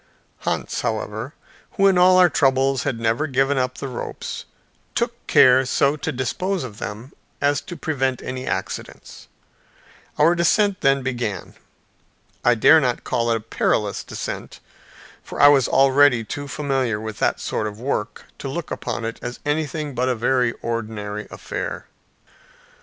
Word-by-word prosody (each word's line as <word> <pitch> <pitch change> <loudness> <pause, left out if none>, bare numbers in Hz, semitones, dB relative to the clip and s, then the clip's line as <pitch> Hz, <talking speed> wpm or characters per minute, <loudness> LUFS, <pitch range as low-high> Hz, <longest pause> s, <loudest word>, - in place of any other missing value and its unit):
Hans, - - -2
however, 110 +5 -3 0.4
who 195 - +2
in 195 -1 +5
all 180 +1 +6
our 180 -1 +7
troubles 135 -3 +2
had 115 - -1
never 115 +7 0
given 135 0 +1
up 125 0 -1
the 140 - -5
ropes, 125 -2 -6 0.5
took - - -2
care 130 +1 +6
so 140 +2 +2
to 155 +1 -3
dispose 175 +8 -2
of 110 -5 -8
them 110 +5 -7 0.3
as 145 0 +1
to 175 - -9
prevent 135 -5 -1
any 130 0 -5
accidents. - - -5 0.9
Our 160 +3 +5
descent 190 +3 +2
then 135 0 +3
began. 120 -6 -3 0.9
I 120 0 +4
dare 160 +8 +7
not 125 -4 -1
call 120 0 0
it 115 - +2
a - - -8
perilous 105 -2 -1
descent, - - -6 0.6
for - - -9
I 145 - +9
was 140 -4 +4
already 135 -3 +4
too 145 +6 -6
familiar 135 -7 -1
with 110 -1 -6
that - - +1
sort 110 - -2
of 105 0 -8
work 115 -4 -3
to 135 - -5
look 165 +4 -5
upon 120 -1 -4
it 115 - -5
as 120 0 -6
anything 150 0 -2
but 125 +1 0
a 125 - +1
very 125 +1 +1
ordinary 105 -2 -4
affair. - - -5
130 Hz, 155 wpm, -22 LUFS, 115-145 Hz, 0.9 s, I